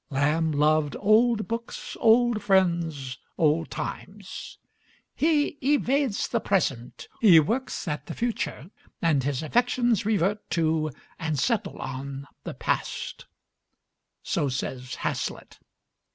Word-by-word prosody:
Lamb 150 Hz, +4 st, +1 dB
loved 150 Hz, 0 st, +2 dB
old 215 Hz, +2 st, +3 dB
books, 230 Hz, +1 st, -5 dB
old 230 Hz, -1 st, +4 dB
friends, 170 Hz, -9 st, +1 dB, 0.2 s
old 160 Hz, +1 st, +2 dB
times; 195 Hz, -1 st, -7 dB, 0.6 s
"he 295 Hz, -2 st, +1 dB
evades 275 Hz, -4 st, +1 dB
the -, -, 0 dB
present, 135 Hz, -11 st, -1 dB
he 185 Hz, -8 st, +8 dB
works 225 Hz, -, -1 dB
at 150 Hz, -2 st, -3 dB
the -, -, -6 dB
future, 225 Hz, -, -3 dB, 0.3 s
and 160 Hz, -5 st, +2 dB
his 140 Hz, +1 st, -2 dB
affections 240 Hz, +4 st, +2 dB
revert 205 Hz, -1 st, 0 dB
to 160 Hz, -2 st, +1 dB, 0.3 s
and 160 Hz, -2 st, -1 dB
settle 230 Hz, -, 0 dB
on 135 Hz, +1 st, -5 dB, 0.2 s
the -, -, -6 dB
past," -, -, -3 dB, 1.0 s
so 145 Hz, -, 0 dB
says 125 Hz, -1 st, -4 dB
Hazlitt. -, -, -4 dB
170 Hz, 110 wpm, -26 LUFS, 150-230 Hz, 1.0 s, he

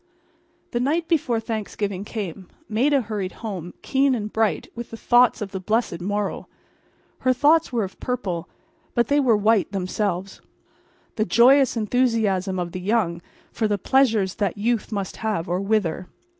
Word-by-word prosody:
The 240 Hz, -, -1 dB
night 315 Hz, +6 st, 0 dB
before 270 Hz, -9 st, +1 dB
Thanksgiving 210 Hz, -3 st, -3 dB
came. 195 Hz, -4 st, -6 dB, 0.2 s
Maida 265 Hz, +6 st, +2 dB
hurried 205 Hz, -4 st, -4 dB
home, 180 Hz, -5 st, -5 dB
keen 270 Hz, -1 st, +2 dB
and 210 Hz, -2 st, -5 dB
bright 220 Hz, -1 st, 0 dB
with 235 Hz, 0 st, -7 dB
the 225 Hz, -, -8 dB
thoughts 240 Hz, -1 st, +4 dB
of 195 Hz, -, -7 dB
the 190 Hz, -, -4 dB
blessed 210 Hz, -3 st, -1 dB
morrow. 205 Hz, +2 st, -2 dB, 0.7 s
Her 255 Hz, 0 st, +2 dB
thoughts 295 Hz, +5 st, +3 dB
were 235 Hz, -3 st, 0 dB
of 190 Hz, -, -7 dB
purple, 190 Hz, -9 st, -3 dB, 0.5 s
but 235 Hz, -2 st, +2 dB
they 285 Hz, +1 st, +4 dB
were 245 Hz, -6 st, +4 dB
white 210 Hz, -1 st, +2 dB
themselves—the 195 Hz, +2 st, -5 dB
joyous 255 Hz, +3 st, +5 dB
enthusiasm 215 Hz, -5 st, +1 dB
of 175 Hz, -1 st, -3 dB
the 185 Hz, 0 st, -5 dB
young 185 Hz, -4 st, 0 dB, 0.3 s
for 220 Hz, -, 0 dB
the 205 Hz, -1 st, 0 dB
pleasures 220 Hz, -4 st, +2 dB
that 205 Hz, -4 st, -1 dB
youth 230 Hz, +2 st, -1 dB
must 200 Hz, -3 st, -3 dB
have 210 Hz, -6 st, -2 dB
or 180 Hz, +2 st, -1 dB
wither. 195 Hz, -4 st, 0 dB
215 Hz, 155 wpm, -23 LUFS, 190-240 Hz, 0.7 s, joyous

